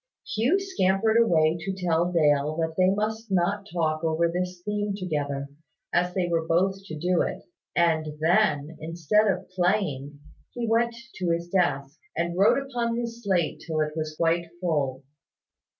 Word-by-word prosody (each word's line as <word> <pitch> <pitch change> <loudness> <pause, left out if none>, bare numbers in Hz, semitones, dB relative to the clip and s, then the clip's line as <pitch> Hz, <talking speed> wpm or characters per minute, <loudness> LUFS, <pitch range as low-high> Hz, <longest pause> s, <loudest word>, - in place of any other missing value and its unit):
Hugh 250 - +3
scampered 220 - +1
away 165 -7 +3
to 190 +3 -4
tell 175 -1 +1
Dale 150 -2 +2
that 160 0 -1
they 185 +1 +4
must 215 +3 -1
not 195 +2 0
talk 155 -2 0
over 165 +1 +2
this 180 +1 -3
theme 210 -1 -1
together, 145 -6 -2 0.5
as 180 +1 +2
they 185 -2 +1
were 165 -1 0
both 190 +3 +2
to 155 -5 -7
do 175 +2 +1
it; - - -3 0.3
and 160 -2 +2
then, 160 -3 +2
instead 170 +6 +1
of 185 -2 -1
playing, 175 -7 0 0.3
he 240 -1 -3
went 230 +1 +2 0.2
to 180 -2 -1
his 170 +1 -1
desk, 145 -7 0 0.2
and 170 0 -1
wrote 195 +3 +5
upon 245 -4 -2
his 235 0 -4
slate 180 -6 0
till 160 -2 -1
it 150 0 -1
was 155 -1 -3
quite 170 +1 +1
full. 145 -7 -1
175 Hz, 160 wpm, -26 LUFS, 160-200 Hz, 0.5 s, wrote